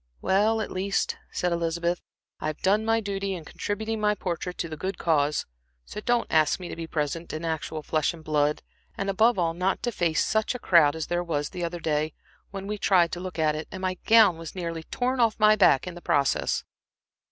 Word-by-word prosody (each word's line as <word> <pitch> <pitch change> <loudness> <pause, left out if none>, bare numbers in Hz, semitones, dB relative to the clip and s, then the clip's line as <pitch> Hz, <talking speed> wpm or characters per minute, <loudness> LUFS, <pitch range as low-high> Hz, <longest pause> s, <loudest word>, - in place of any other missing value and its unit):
"Well, 215 +3 +2
at - - -4
least," 195 +2 -1 0.2
said 180 - -1
Elizabeth, 170 +1 -1 0.4
"I - - -3
have 155 -1 -5
done 205 +3 +3
my 225 0 +2
duty 200 -1 -3
in 165 -3 -8
contributing 220 +5 -3
my 210 0 +2
portrait 180 -1 -4
to 170 - -2
the 160 - -6
good 185 +5 -4
cause; 150 -3 +1 0.4
so 210 - -7
don't 240 +1 +1
ask 155 +1 +3
me 180 - -7
to - - -5
be 165 -1 -6
present 160 +2 -3
in 155 +2 -4
actual 160 -1 -3
flesh 155 +1 +1
and 165 -2 -12
blood, 150 -1 +1 0.3
and 195 0 -1
above 225 +4 +3
all 165 -2 +1
not 185 +3 -1
to 240 - 0
face 170 -7 +1
such 220 +3 0
a - - -4
crowd 160 -7 +5
as 160 -1 -3
there 175 0 -1
was 150 -4 -2
the 180 -2 -5
other 170 +1 -3
day, 155 -1 -1 0.4
when 195 0 -6
we 210 +1 -4
tried 175 -5 +4
to 175 - -4
look 185 0 -6
at 155 -1 +2
it 155 - -5
and 185 - -7
my 185 -1 0
gown 215 -7 +6
was 165 +1 -8
nearly 170 -3 -4
torn 250 +9 -2
off 225 -2 +2
my 215 0 +6
back 135 -10 +4
in 180 - -6
the 175 - -10
process." 140 -4 +1
175 Hz, 220 wpm, -26 LUFS, 160-200 Hz, 0.4 s, gown